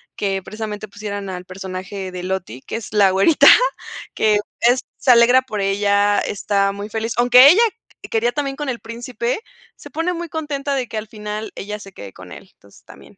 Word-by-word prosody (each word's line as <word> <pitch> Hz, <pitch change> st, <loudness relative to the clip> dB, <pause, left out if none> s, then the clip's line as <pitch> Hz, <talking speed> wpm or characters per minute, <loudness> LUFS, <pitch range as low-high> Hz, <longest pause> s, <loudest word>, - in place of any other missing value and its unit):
que 195 Hz, -1 st, -2 dB
precisamente 215 Hz, +1 st, -6 dB
pusieran 205 Hz, -1 st, -6 dB
al 180 Hz, -1 st, -6 dB
personaje 185 Hz, +1 st, -7 dB
de 180 Hz, -1 st, -6 dB
Lottie, 180 Hz, -9 st, -4 dB
que -, -, -6 dB
es 230 Hz, -, -9 dB
la 200 Hz, -3 st, +4 dB
güerita 195 Hz, -, +4 dB, 0.7 s
que 210 Hz, -1 st, +3 dB, 0.2 s
es 245 Hz, +2 st, +4 dB, 0.2 s
se 260 Hz, -, +3 dB
alegra 245 Hz, +2 st, +6 dB
por 215 Hz, -5 st, -5 dB
ella, 200 Hz, +1 st, +2 dB
está 200 Hz, -1 st, 0 dB
muy 200 Hz, +1 st, -7 dB
feliz, 225 Hz, +1 st, -3 dB
aunque 250 Hz, +3 st, +8 dB
ella 395 Hz, +8 st, +5 dB, 0.5 s
quería 230 Hz, +2 st, +1 dB
también 275 Hz, 0 st, -3 dB
con 295 Hz, -2 st, -4 dB
el 240 Hz, -2 st, -3 dB
príncipe, 235 Hz, -, -4 dB, 0.4 s
se -, -, -13 dB
pone 330 Hz, +3 st, -1 dB
muy 340 Hz, -1 st, -6 dB
contenta 290 Hz, -3 st, -3 dB
de 255 Hz, -3 st, -2 dB
que 220 Hz, -, -6 dB
al 215 Hz, +1 st, -5 dB
final, 210 Hz, 0 st, -6 dB
ella 210 Hz, +1 st, -6 dB
se 195 Hz, -1 st, -12 dB
quede 100 Hz, -, -10 dB
con -, -, -13 dB
él, -, -, -12 dB
entonces, -, -, -22 dB
también. -, -, -16 dB
215 Hz, 190 wpm, -20 LUFS, 195-245 Hz, 0.7 s, aunque